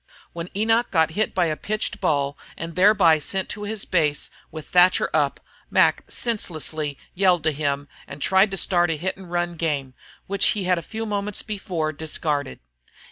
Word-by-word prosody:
When 170 +1 -5
Enoch 225 +3 +2
got 160 -3 +2
hit 215 +6 -1
by 180 - +3
a 155 -2 0
pitched 215 +5 -3
ball 145 -5 +1 0.2
and 165 0 -6
thereby 185 -4 +5
sent 190 +5 -2
to 210 -1 -5
his 215 -1 -3
base, 150 -5 0 0.2
with 155 -1 -8
Thatcher 180 +1 +4
up, - - +1 0.3
Mac - - +3
senselessly 155 - -3 0.2
yelled 180 -3 +3
to 155 - +2
him 145 -1 -2 0.2
and 140 - -9
tried 190 +7 +4
to 195 - -4
start 175 0 +2
the 165 -2 -1
hit 190 +4 -2
and 190 -2 -12
run 175 -1 -1
game, 145 -5 -2 0.3
which 200 0 +2
he 200 - -1
had 180 -1 +2
a - - -6
few 220 +7 -5
moments 205 -1 -2
before 180 -7 -2
discarded. 150 -2 -3
175 Hz, 180 wpm, -23 LUFS, 155-195 Hz, 0.3 s, thereby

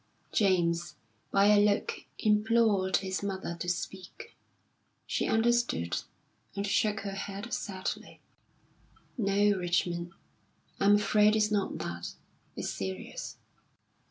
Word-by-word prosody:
James, 175 -5 +2 0.3
by 200 0 +4
a 210 0 +6
look, 205 0 +2 0.2
implored 210 -3 +3
his 190 -1 -3
mother 190 -3 -3
to 175 - -3
speak. 185 +1 -5 0.7
She - - -1
understood, 230 - +1 0.5
and 200 0 -2
shook 210 +1 +1
her 200 0 -4
head 200 +3 -5
sadly. 190 -2 -4 1.0
"No, 205 -2 +3
Richmond, 175 -1 -1 0.7
I'm 205 +1 +6
afraid 210 +1 +4
it's 215 -1 +2
not 205 -2 0
that. 85 -6 -5 0.4
It's - - -3
serious." 95 -2 -5
200 Hz, 105 wpm, -30 LUFS, 175-210 Hz, 1.0 s, a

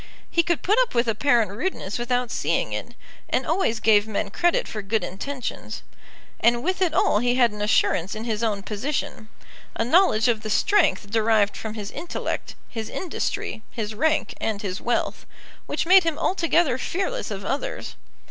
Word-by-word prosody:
He 340 - +4
could 340 0 -1
put 420 +6 +3
up - - +1
with 235 0 +2
apparent 230 -1 +2
rudeness 210 - -3
without 245 0 -1
seeing - - 0
it, - - -5 0.3
and - - 0
always 230 - +1
gave 215 -1 +4
men 200 -1 -2
credit 345 - +1
for 215 - -5
good 205 0 -1
intentions. 250 +9 -5 0.6
And 235 0 +3
with 370 +3 -1
it 360 -3 +3
all 210 - +3
he 245 +2 +1
had 245 -3 +4
an 210 0 -7
assurance 205 -3 +2
in 215 - -5
his 225 -2 -2
own 210 -4 -1
position, 225 +1 -3 0.5
a 225 - 0
knowledge 255 - +4
of 230 -3 +1
the 215 - -5
strength 310 - +2
derived 220 -2 +3
from 220 -1 -6
his 205 -2 -6
intellect, 345 - -4
his 225 -2 -5
industry, 345 -9 -3
his 220 -2 -4
rank, 300 0 +1
and 215 -1 -2
his 190 -1 -4
wealth, 240 - -1 0.4
which - - -1
made 375 +2 +7
him 330 -2 -1
altogether 335 -7 +2
fearless 395 - -2
of - - -5
others. - - -3
235 Hz, 175 wpm, -24 LUFS, 215-320 Hz, 0.6 s, made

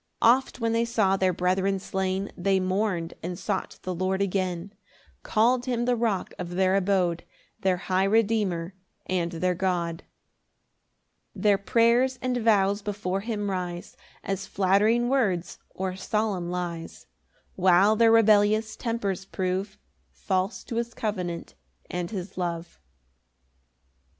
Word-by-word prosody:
4 230 - +6
Oft 255 +1 +2
when 230 -1 0
they 230 0 +2
saw 220 -5 +2
their 190 -1 +2
brethren 185 +2 +1
slain, 190 +1 -2
They 190 +1 +1
mourn'd 185 -2 -1
and 175 +1 -4
sought - - -3
the 185 - -3
Lord 185 +2 -1
again; 185 -1 -2 0.5
Call'd 240 +3 +2
him 240 -1 0
the 250 0 +2
Rock 225 -5 -1
of 175 -1 -5
their 190 0 +3
abode, 185 -3 +1 0.4
Their 185 -1 +1
high 185 +1 0
Redeemer 200 -5 +1 0.3
and 175 -2 -1
their 180 +2 0
God. 175 -3 -1 1.3
5 - - -8
Their 205 -2 +4
prayers 235 +5 +3
and 255 -1 -1
vows 205 -3 +3
before 200 -2 -2
him 205 -2 -2
rise 180 -2 -4 0.3
As 195 0 -3
flattering 205 +6 +2
words 200 -10 0
or 190 -1 -4
solemn 195 -2 -1
lies, 175 -2 -5 0.5
While 190 +3 +5
their 225 0 +5
rebellious 215 0 +4
tempers 200 -5 -2
prove 190 +2 -3 0.3
False 190 +1 -2
to 230 - -5
his 235 0 -3
covenant 180 -6 -3 0.4
and 175 -1 -3
his 185 -2 -6
love. 170 -1 -4
195 Hz, 135 wpm, -26 LUFS, 180-220 Hz, 1.3 s, 4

